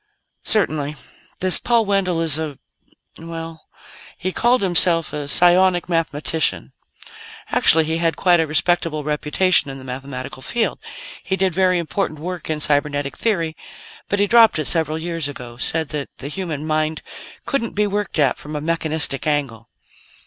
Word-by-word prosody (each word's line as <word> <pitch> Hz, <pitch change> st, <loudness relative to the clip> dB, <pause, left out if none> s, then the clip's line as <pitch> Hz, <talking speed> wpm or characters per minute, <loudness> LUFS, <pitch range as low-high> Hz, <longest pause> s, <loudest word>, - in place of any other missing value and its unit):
"Certainly. 150 Hz, -8 st, 0 dB, 0.5 s
This 185 Hz, 0 st, +6 dB
Paul 235 Hz, -2 st, +1 dB
Wendell 190 Hz, -4 st, 0 dB
is 160 Hz, -2 st, +6 dB
a 150 Hz, -4 st, -5 dB, 0.6 s
well, 165 Hz, -1 st, -9 dB, 0.5 s
he 185 Hz, +1 st, -3 dB
called 240 Hz, +3 st, +1 dB
himself 170 Hz, -2 st, +3 dB
a 145 Hz, -1 st, -4 dB
psionic 175 Hz, +3 st, +4 dB
mathematician. 160 Hz, -2 st, -1 dB, 0.8 s
Actually, 160 Hz, 0 st, +4 dB
he 160 Hz, +1 st, -2 dB
had 165 Hz, -1 st, 0 dB
quite 175 Hz, -2 st, +3 dB
a 160 Hz, -, 0 dB
respectable 155 Hz, 0 st, 0 dB
reputation 150 Hz, +3 st, +1 dB
in 135 Hz, -, -7 dB
the 130 Hz, -, -11 dB
mathematical 130 Hz, 0 st, -7 dB
field. 235 Hz, -, -2 dB, 0.4 s
He 190 Hz, -, -2 dB
did 190 Hz, -2 st, 0 dB
very 185 Hz, 0 st, +2 dB
important 170 Hz, -2 st, -3 dB
work 175 Hz, +1 st, -6 dB
in 155 Hz, -1 st, -2 dB
cybernetic 145 Hz, -1 st, 0 dB
theory, 170 Hz, -8 st, -1 dB, 0.5 s
but 205 Hz, -, 0 dB
he 205 Hz, -, +2 dB
dropped 225 Hz, -1 st, +5 dB
it 155 Hz, -, -2 dB
several 160 Hz, -1 st, 0 dB
years 165 Hz, -2 st, -3 dB
ago 125 Hz, -4 st, -9 dB
said 160 Hz, +4 st, 0 dB
that 150 Hz, -2 st, -5 dB
the 140 Hz, -, -7 dB
human 155 Hz, -3 st, -5 dB
mind 155 Hz, 0 st, -2 dB, 0.4 s
couldn't 255 Hz, -5 st, -2 dB
be 210 Hz, 0 st, +1 dB
worked 205 Hz, -2 st, -3 dB
at 140 Hz, -4 st, +1 dB
from 150 Hz, +1 st, -8 dB
a -, -, -2 dB
mechanistic 155 Hz, -3 st, +2 dB
angle. 135 Hz, -7 st, -2 dB
160 Hz, 155 wpm, -20 LUFS, 150-185 Hz, 0.8 s, This